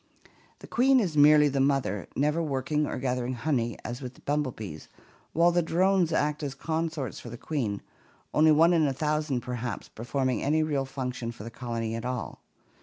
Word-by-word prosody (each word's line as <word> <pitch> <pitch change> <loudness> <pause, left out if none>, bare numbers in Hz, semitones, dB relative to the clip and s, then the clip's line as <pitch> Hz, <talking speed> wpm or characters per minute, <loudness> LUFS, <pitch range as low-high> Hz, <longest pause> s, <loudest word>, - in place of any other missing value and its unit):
The - - -10
queen 260 +2 +4
is 180 -9 -1
merely 150 0 +7
the 140 -1 -1
mother, 135 -9 +1
never 150 +4 +1
working 150 0 0
or - - -3
gathering 125 -1 -1
honey 120 -2 -1
as 120 +1 -5
with 125 -1 -7
the - - -19
bumblebees, 125 - -3 0.4
while 170 +2 +4
the 175 0 +3
drones 180 +1 +2
act 150 -1 0
as 140 -2 -4
consorts 160 -1 -3
for 120 - -9
the 120 - -8
queen, 115 -9 -3 0.5
only 155 +1 +5
one 165 +3 +5
in 160 -3 +3
a 135 - 0
thousand, 150 -2 -1
perhaps, 125 0 -5
performing 130 +2 -2
any 155 +3 +2
real 145 -3 0
function 125 -3 -4
for 115 - -10
the 115 - -7
colony 115 -2 -4
at 115 0 -4
all. 125 -1 -4
140 Hz, 180 wpm, -28 LUFS, 125-155 Hz, 0.5 s, merely